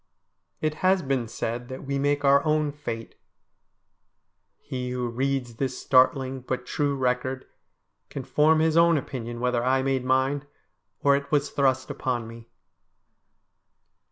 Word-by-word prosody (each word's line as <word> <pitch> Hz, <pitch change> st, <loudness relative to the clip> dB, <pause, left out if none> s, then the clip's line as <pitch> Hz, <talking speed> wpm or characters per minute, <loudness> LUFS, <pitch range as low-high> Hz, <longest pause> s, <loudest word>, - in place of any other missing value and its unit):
It 155 Hz, -1 st, 0 dB
has 185 Hz, 0 st, +4 dB
been 130 Hz, -4 st, -1 dB
said 120 Hz, +2 st, -4 dB
that 130 Hz, +1 st, -8 dB
we 140 Hz, 0 st, -2 dB
make 145 Hz, 0 st, +1 dB
our 140 Hz, 0 st, +5 dB
own 155 Hz, -1 st, +1 dB
fate. 115 Hz, -6 st, -6 dB, 1.4 s
He 125 Hz, -1 st, -5 dB
who 125 Hz, -1 st, -2 dB
reads 125 Hz, -1 st, -2 dB
this 130 Hz, -1 st, -2 dB
startling, 130 Hz, 0 st, +3 dB
but 125 Hz, 0 st, -4 dB
true, 145 Hz, +1 st, -1 dB
record 130 Hz, 0 st, -1 dB, 0.6 s
can 135 Hz, -, -6 dB
form 155 Hz, +4 st, +3 dB
his 160 Hz, 0 st, +2 dB
own 170 Hz, -1 st, +5 dB
opinion 120 Hz, -4 st, -5 dB
whether 125 Hz, -1 st, 0 dB
I 130 Hz, +1 st, +2 dB
made 135 Hz, -1 st, 0 dB
mine, 130 Hz, +3 st, +1 dB, 0.6 s
or 140 Hz, 0 st, +5 dB
it 140 Hz, 0 st, -4 dB
was 145 Hz, -1 st, +1 dB
thrust 130 Hz, -2 st, +1 dB
upon 120 Hz, -3 st, -2 dB
me. 115 Hz, 0 st, -11 dB
130 Hz, 140 wpm, -26 LUFS, 125-145 Hz, 1.4 s, our